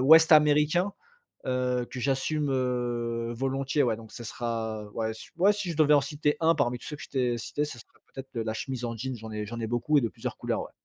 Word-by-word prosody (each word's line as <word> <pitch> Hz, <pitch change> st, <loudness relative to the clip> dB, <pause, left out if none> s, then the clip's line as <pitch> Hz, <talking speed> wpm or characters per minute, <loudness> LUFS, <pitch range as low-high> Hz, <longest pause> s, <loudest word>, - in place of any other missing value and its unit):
ouest 160 Hz, +4 st, +8 dB
américain, 150 Hz, +5 st, +5 dB, 0.5 s
heu, 125 Hz, -1 st, 0 dB
que 130 Hz, -, -6 dB
j'assume, 140 Hz, +3 st, 0 dB
heu, 120 Hz, -2 st, -1 dB
volontiers. 135 Hz, +3 st, 0 dB
Ouais 115 Hz, -3 st, +1 dB
donc 110 Hz, -1 st, -12 dB
ça -, -, -8 dB
sera, 115 Hz, -2 st, -3 dB
heu, 105 Hz, -, -12 dB
ouais, 110 Hz, -1 st, -1 dB
si -, -, -11 dB
j -, -, -28 dB
ouais, 195 Hz, +4 st, +6 dB
si 200 Hz, -4 st, -3 dB
je 160 Hz, -, -8 dB
devais 150 Hz, -1 st, +5 dB
en 145 Hz, -, +5 dB
citer 150 Hz, +1 st, 0 dB
un 165 Hz, +1 st, +4 dB
parmi 125 Hz, -5 st, +1 dB
tous -, -, -12 dB
ceux 150 Hz, -, -5 dB
que -, -, -11 dB
je -, -, -9 dB
t'ai 125 Hz, -3 st, 0 dB
cités, 145 Hz, +6 st, -2 dB
ça 130 Hz, -5 st, -8 dB
serait -, -, -15 dB, 0.2 s
peut-être, 135 Hz, 0 st, -7 dB
heu, 115 Hz, -, 0 dB
la 110 Hz, -, -1 dB
chemise 125 Hz, +1 st, -4 dB
en 115 Hz, -, -2 dB
jean, 130 Hz, +2 st, -4 dB
j'en 110 Hz, -1 st, -9 dB, 0.2 s
j'en 115 Hz, +2 st, -6 dB
ai 115 Hz, -, -1 dB
beaucoup 120 Hz, +6 st, +1 dB
et -, -, +2 dB
de 115 Hz, -, +1 dB
plusieurs -, -, -6 dB
couleurs, -, -, -1 dB
ouais. -, -, -9 dB
130 Hz, 255 wpm, -28 LUFS, 115-150 Hz, 0.5 s, ouest